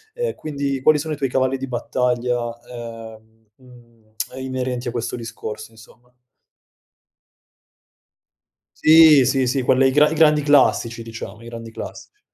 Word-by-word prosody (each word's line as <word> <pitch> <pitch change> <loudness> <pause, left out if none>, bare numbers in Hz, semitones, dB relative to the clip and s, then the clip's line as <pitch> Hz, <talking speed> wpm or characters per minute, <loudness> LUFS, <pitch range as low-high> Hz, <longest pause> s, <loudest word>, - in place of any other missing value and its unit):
Ehm, 485 -1 -2
quindi, 140 -3 -4
quali 155 +3 +4
sono 155 +1 -4
i - - -5
tuoi 135 -2 -1
cavalli 130 +1 0
di 135 0 -6
battaglia, 125 0 -1 0.3
ehm, 115 -2 -11
uhm, 120 -4 -21 0.2
inerenti 130 -1 -4
a - - -2
questo 120 -1 -4
discorso, 110 -2 -7
insomma? 115 +2 -20 2.7
Sì, 155 -3 +7
sì, 130 0 +1
sì, 130 +1 0
quelle 130 +2 +3
i - - +1
gran 150 +3 +4
i - - -1
grandi 150 -2 +4
classici, 130 -5 +2
diciamo. 115 -1 -9
I 115 - -12
grandi 115 -1 -9
classici. - - -10
125 Hz, 140 wpm, -21 LUFS, 115-140 Hz, 2.7 s, Sì